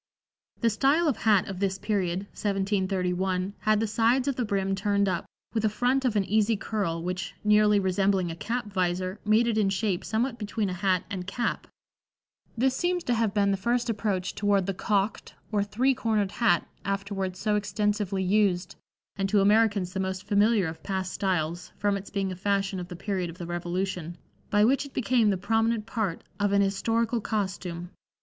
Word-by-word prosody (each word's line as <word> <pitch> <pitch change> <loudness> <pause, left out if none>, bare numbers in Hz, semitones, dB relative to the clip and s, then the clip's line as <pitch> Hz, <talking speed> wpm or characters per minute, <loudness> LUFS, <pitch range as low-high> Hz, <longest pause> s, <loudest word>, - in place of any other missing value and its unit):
The 230 -2 +3
style 280 +9 +3
of 285 - +2
hat 210 -4 +3
of 195 -2 -5
this 195 -1 0
period 190 -4 -1
(1731) 190 -2 -1
had 215 -1 +2
the 225 - +1
sides 230 +5 +2
of 280 - +1
the 250 - -1
brim 195 -3 0
turned 200 +1 +1
up, 185 - -2 0.3
with 225 -2 0
a 215 - +3
front 250 +5 +1
of 240 -4 +1
an 205 - +3
easy 215 +2 +2
curl, 180 -7 -2
which, 180 +1 -4
nearly 210 0 +5
resembling 190 -1 +1
a - - -6
cap 230 +8 -3
visor, 185 +1 -1
made 215 +3 +4
it 225 -2 +1
in 200 -2 +3
shape 195 -2 -1
somewhat 235 +2 -1
between 210 -2 -2
a - - -2
hat 185 -1 +1
and 185 -2 -4
cap; 235 +4 -2 0.9
this 260 +2 +2
seems 355 +3 0
to 245 - 0
have 225 -3 +1
been 200 -1 +3
the 195 - +1
first 235 +3 0
approach 200 -4 -2
toward 200 -2 +1
the 195 - -1
"cocked" 200 +2 -1 0.2
or 210 -2 +2
three 245 +6 +1
cornered 220 -6 0
hat 200 -8 +2 0.2
afterwards 195 -1 -3
so 210 +2 0
extensively 205 -2 0
used, 190 -2 +1 0.4
and 195 -1 0
to 205 - +4
Americans 205 -2 +3
the 190 - -2
most 190 0 -2
familiar 205 0 +3
of 160 0 -5
past 190 -2 -3
styles, 175 -3 -2
from 205 -1 +1
its 200 0 -6
being 195 -2 -2
a - - -4
fashion 195 0 0
of 175 - -6
the 180 - -8
period 185 -1 -2
of 170 - -10
the 175 - -6
Revolution, 175 0 -3 0.3
by 210 0 +4
which 270 +4 +3
it 280 - -12
became 240 -3 +3
the 195 - +1
prominent 225 +3 +1
part 200 -4 -2 0.2
of 205 0 +1
an 200 - +4
historical 225 +4 0
costume. 185 -4 -3
200 Hz, 190 wpm, -27 LUFS, 185-220 Hz, 0.9 s, nearly